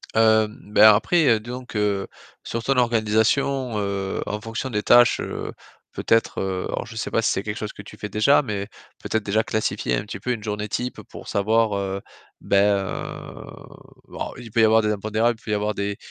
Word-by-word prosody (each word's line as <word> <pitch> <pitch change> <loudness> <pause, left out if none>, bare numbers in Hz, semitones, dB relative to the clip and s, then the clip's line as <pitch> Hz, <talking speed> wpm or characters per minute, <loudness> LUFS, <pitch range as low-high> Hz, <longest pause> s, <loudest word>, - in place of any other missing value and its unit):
Hem, 110 -1 +3
ben, 105 0 +8
après, 155 +9 +2
heu, 115 -3 +4
disons 125 +3 -7
que, 105 -4 -1 0.4
sur 115 0 -4
ton 135 +2 +1
organisation, 120 +2 +1
heu, 100 -1 -2
en 105 - -3
fonction 115 +4 -5
des 105 -4 -1
tâches, 120 0 +6
heu, - - -5 0.4
peut-être, 115 0 +1
heu, 95 -1 -2
alors, - - -3
je 115 -1 -11
sais 110 - -4
pas 115 - +2
si - - +2
c'est 95 - -1
quelque 105 +1 -4
chose 105 - -5
que - - -10
tu 105 - -13
fais 105 - -5
déjà 110 +9 +4
mais 100 -6 -4 0.4
peut-être, 110 -1 -1
déjà, 105 +2 +1
classifier 110 - -1
un - - -2
petit 105 -2 -7
peu 125 - -2
une 115 -4 -3
journée 105 -1 -3
type 125 +4 -3
pour - - -11
savoir, 110 +2 +2
heu, 100 0 -3 0.4
ben, 100 0 +3
heu - - -5 1.2
alors, - - -6
il 120 -2 -10
peut 115 - +2
y - - +6
avoir 110 +1 +5
des 105 0 0
impondérables. 110 +3 0
Il - - -25
peut 110 - -5
y - - +2
avoir 105 +1 0
des 100 0 -3
110 Hz, 210 wpm, -23 LUFS, 105-115 Hz, 1.2 s, ben